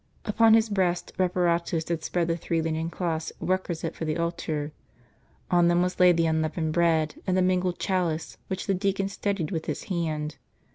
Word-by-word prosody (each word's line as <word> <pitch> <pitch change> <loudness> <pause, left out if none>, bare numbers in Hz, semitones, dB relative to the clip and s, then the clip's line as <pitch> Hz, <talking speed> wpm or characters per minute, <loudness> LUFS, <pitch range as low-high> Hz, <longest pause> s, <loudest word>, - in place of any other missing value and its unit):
Upon 220 +1 +5
his 225 0 +4
breast 185 -4 0
Reparatus 175 -3 +1
had 165 -2 -1
spread 175 -2 0
the 165 - +1
three 165 0 -1
linen 160 0 -1
cloths 165 -2 -2
requisite 175 -3 -2
for - - -6
the 155 0 -1
altar; 160 -3 -2 0.8
on 175 -1 +5
them 175 +1 +3
was 180 0 -2
laid 180 -1 +7
M - - -1
the 165 0 +2
unleavened 160 0 0
bread, 160 -2 +1
and 185 0 +2
the - - +4
mingled 180 -1 +1
chalice, 175 -4 -1
which 190 -1 -3
the 195 - +1
deacon 195 +1 0
steadied 195 -4 -2
with 160 -3 -3
his - - -3
hand. 155 -3 -2
170 Hz, 185 wpm, -26 LUFS, 160-185 Hz, 0.8 s, laid